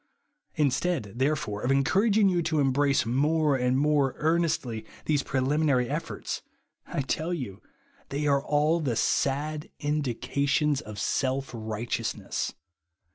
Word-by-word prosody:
Instead, 145 Hz, -, 0 dB
therefore, 130 Hz, -7 st, 0 dB
of 125 Hz, -, -1 dB
encouraging 195 Hz, -, +3 dB
you 180 Hz, -2 st, +2 dB
to 160 Hz, -1 st, 0 dB
embrace 140 Hz, 0 st, +2 dB
more 145 Hz, +4 st, +2 dB
and 125 Hz, 0 st, +1 dB
more 145 Hz, -2 st, +2 dB
earnestly 155 Hz, -8 st, 0 dB, 0.2 s
these 150 Hz, -2 st, +2 dB
prelimi 135 Hz, +4 st, 0 dB
nary 125 Hz, -4 st, +3 dB
efforts, -, -, -4 dB, 0.5 s
I -, -, -2 dB
tell 160 Hz, +6 st, -1 dB
you 110 Hz, -, -6 dB, 0.5 s
they 145 Hz, +2 st, -2 dB
are 140 Hz, -1 st, +3 dB
all 150 Hz, +3 st, +2 dB
the 135 Hz, -7 st, -1 dB
sad 150 Hz, +6 st, 0 dB
indications 145 Hz, +1 st, 0 dB
of 105 Hz, -1 st, -9 dB
self 135 Hz, +6 st, -1 dB
righteousness. 110 Hz, 0 st, -3 dB
140 Hz, 125 wpm, -27 LUFS, 130-155 Hz, 0.5 s, encouraging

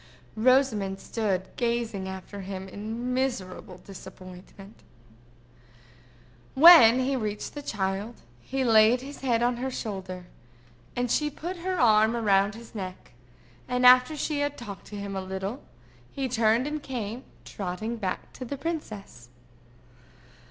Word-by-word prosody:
Rosamond 220 Hz, -5 st, +2 dB
stood 195 Hz, -5 st, -2 dB
gazing 235 Hz, -5 st, -1 dB
after 190 Hz, +1 st, -8 dB
him 190 Hz, 0 st, -6 dB
in 225 Hz, +6 st, -5 dB
miserable 245 Hz, -8 st, -3 dB
disappointment. 190 Hz, +1 st, -13 dB, 1.7 s
When 265 Hz, -6 st, +9 dB
he 270 Hz, +1 st, 0 dB
reached 210 Hz, -4 st, -4 dB
the 290 Hz, -, -6 dB
child, 205 Hz, -1 st, -3 dB, 0.2 s
he 265 Hz, -, -3 dB
laid 225 Hz, +1 st, +5 dB
his 280 Hz, +2 st, -9 dB
head 240 Hz, -3 st, +1 dB
on 245 Hz, 0 st, +1 dB
her 260 Hz, +2 st, -2 dB
shoulder, 190 Hz, -7 st, -6 dB, 0.7 s
and 245 Hz, -1 st, -1 dB
she 300 Hz, -1 st, +1 dB
put 345 Hz, +5 st, -6 dB
her 365 Hz, +1 st, -3 dB
arm 220 Hz, -1 st, +4 dB
up 230 Hz, -1 st, -3 dB
round 200 Hz, +1 st, +3 dB
his 230 Hz, 0 st, -12 dB
neck; 185 Hz, -, -7 dB, 0.6 s
and 250 Hz, 0 st, 0 dB
after 250 Hz, +4 st, +7 dB
she 295 Hz, 0 st, -2 dB
had 290 Hz, 0 st, -1 dB
talked 205 Hz, -5 st, -9 dB
to 210 Hz, -, -9 dB
him 200 Hz, -1 st, -5 dB
a 190 Hz, -, -2 dB
little, 190 Hz, +6 st, -5 dB, 0.5 s
he 270 Hz, -1 st, -2 dB
turned 230 Hz, 0 st, +2 dB
and 300 Hz, +1 st, -3 dB
came 245 Hz, -2 st, -5 dB, 0.2 s
trotting 210 Hz, +5 st, -4 dB
back 190 Hz, -4 st, -4 dB
to -, -, -8 dB
the 275 Hz, +3 st, -5 dB
princess. 215 Hz, -, -6 dB
225 Hz, 140 wpm, -27 LUFS, 195-255 Hz, 1.7 s, When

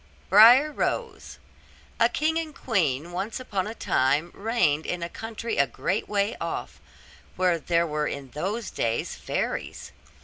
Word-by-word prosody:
BRIAR 240 Hz, +9 st, +8 dB
ROSE 465 Hz, +9 st, -3 dB, 0.6 s
A -, -, +5 dB
king 320 Hz, +2 st, 0 dB
and 315 Hz, -3 st, -6 dB
queen 170 Hz, -, 0 dB
once 195 Hz, +7 st, -4 dB
upon 205 Hz, -6 st, -3 dB
a 220 Hz, -, -6 dB
time 145 Hz, -, +1 dB
reigned 185 Hz, -9 st, 0 dB
in 180 Hz, -1 st, -3 dB
a 170 Hz, -, -4 dB
country 225 Hz, +3 st, -5 dB
a 140 Hz, -, +4 dB
great 185 Hz, -, -2 dB
way 205 Hz, +2 st, 0 dB
off, -, -, -5 dB, 0.5 s
where 180 Hz, -2 st, +2 dB
there 170 Hz, +2 st, +1 dB
were 150 Hz, -1 st, -1 dB
in 135 Hz, -2 st, -6 dB
those 200 Hz, +8 st, -3 dB
days 115 Hz, 0 st, -1 dB
fairies. -, -, -4 dB
190 Hz, 145 wpm, -26 LUFS, 155-230 Hz, 0.6 s, BRIAR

